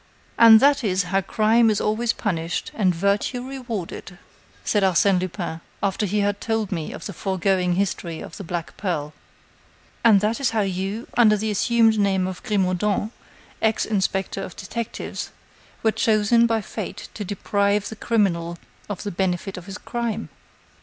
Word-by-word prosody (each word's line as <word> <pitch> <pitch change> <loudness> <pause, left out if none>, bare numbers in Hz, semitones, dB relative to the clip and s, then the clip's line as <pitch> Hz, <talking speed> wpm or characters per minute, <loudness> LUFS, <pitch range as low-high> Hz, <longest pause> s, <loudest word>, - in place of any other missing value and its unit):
"And 225 -1 +9
that 280 -1 +4
is 190 -3 +1
how 190 +2 0
crime 220 +4 +3
is 210 - +1
always 225 +2 +1
punished 170 -5 -2
and 185 -5 +2
virtue 200 +7 0
rewarded," 230 -9 -6 0.5
said 205 - +2
Arsène 190 0 +3
Lupin, 175 -3 -4 0.2
after 200 +1 0
he 205 +2 0
had 200 0 0
told 225 -3 -1
me 165 -5 -3
the 200 - -7
foregoing 190 0 0
history 175 -3 -2
of 160 - -9
the 200 - -7
black 170 -1 -5
pearl. 155 -6 -2 0.9
"And 220 -4 +7
that 215 +3 0
is 275 - +2
how 225 -1 0
you, 195 +4 -3
under 215 -3 +5
the 215 +1 -1
assumed 225 +1 +3
name 195 -2 +2
of 185 -1 -5
Grimaudan, 205 +1 0 0.5
ex 220 0 +2
inspector 195 -2 -1
of 185 - -7
detectives, 230 +3 -5 0.5
were 220 - +4
chosen 220 +2 +3
by 225 -1 +1
fate - - -6
to 210 - -5
deprive 200 +1 0
the 220 - -7
criminal 175 -7 0 0.3
of 205 - -4
the 205 - -3
benefit 190 +1 -1
of 180 +1 -9
his 195 +1 -6
crime." 230 -2 -3
200 Hz, 160 wpm, -23 LUFS, 185-220 Hz, 0.9 s, And